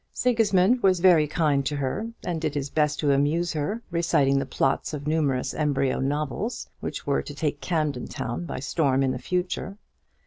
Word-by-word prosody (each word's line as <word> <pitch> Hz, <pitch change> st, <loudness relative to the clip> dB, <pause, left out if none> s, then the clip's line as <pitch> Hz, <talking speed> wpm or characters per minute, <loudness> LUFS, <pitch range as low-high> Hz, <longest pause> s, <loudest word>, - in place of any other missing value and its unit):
Sigismund 225 Hz, -2 st, +3 dB
was 185 Hz, -3 st, +4 dB
very 170 Hz, -4 st, +5 dB
kind 150 Hz, -3 st, +1 dB
to 145 Hz, +2 st, -2 dB
her, 145 Hz, +11 st, -2 dB, 0.2 s
and 170 Hz, -3 st, -2 dB
did 155 Hz, -2 st, -2 dB
his 140 Hz, -1 st, -3 dB
best 150 Hz, -1 st, +1 dB
to 145 Hz, -2 st, +2 dB
amuse 155 Hz, +5 st, +1 dB
her, 180 Hz, +10 st, -2 dB
reciting 145 Hz, -5 st, +2 dB
the 135 Hz, -, -3 dB
plots 135 Hz, +3 st, 0 dB
of 145 Hz, -1 st, -7 dB
numerous 150 Hz, -5 st, 0 dB
embryo 140 Hz, -3 st, 0 dB
novels, 140 Hz, 0 st, -2 dB
which -, -, -5 dB
were 70 Hz, -, +1 dB
to 145 Hz, -, -9 dB
take 145 Hz, -1 st, -2 dB
Camden 150 Hz, -7 st, -1 dB
Town 120 Hz, +8 st, -4 dB
by -, -, -5 dB
storm 135 Hz, -1 st, +1 dB
in 130 Hz, -, +1 dB
the 130 Hz, -, -4 dB
future. 180 Hz, +4 st, -3 dB
150 Hz, 180 wpm, -25 LUFS, 140-175 Hz, 0.2 s, very